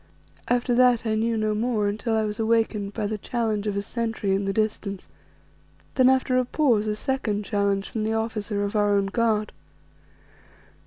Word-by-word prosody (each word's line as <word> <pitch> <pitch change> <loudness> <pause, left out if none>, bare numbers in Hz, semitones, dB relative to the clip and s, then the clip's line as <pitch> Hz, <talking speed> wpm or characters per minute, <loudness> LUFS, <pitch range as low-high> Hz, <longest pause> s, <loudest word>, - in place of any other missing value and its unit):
After 245 0 +1
that 245 -1 +4
I 220 - 0
knew 225 +1 0
no 215 0 0
more 215 -1 0
until 215 +2 -1
I 220 - +1
was 210 0 -3
awakened 220 -2 +1
by 215 - -2
the 210 +1 -3
challenge 220 -2 -2
of 200 -1 -1
a 200 - -1
sentry 225 -3 -2
in 195 +1 0
the 195 - 0
distance; 205 -2 -2 0.9
then 255 -1 +5
after 260 -1 +2
a 255 - 0
pause, 240 -6 +2
a 210 - 0
second 215 -4 -2
challenge 200 -2 0
from 220 - -3
the 220 +1 0
officer 220 -2 -2
of 205 +1 -3
our 205 -1 +3
own 200 - +1
guard. 215 0 0
215 Hz, 180 wpm, -25 LUFS, 205-230 Hz, 0.9 s, then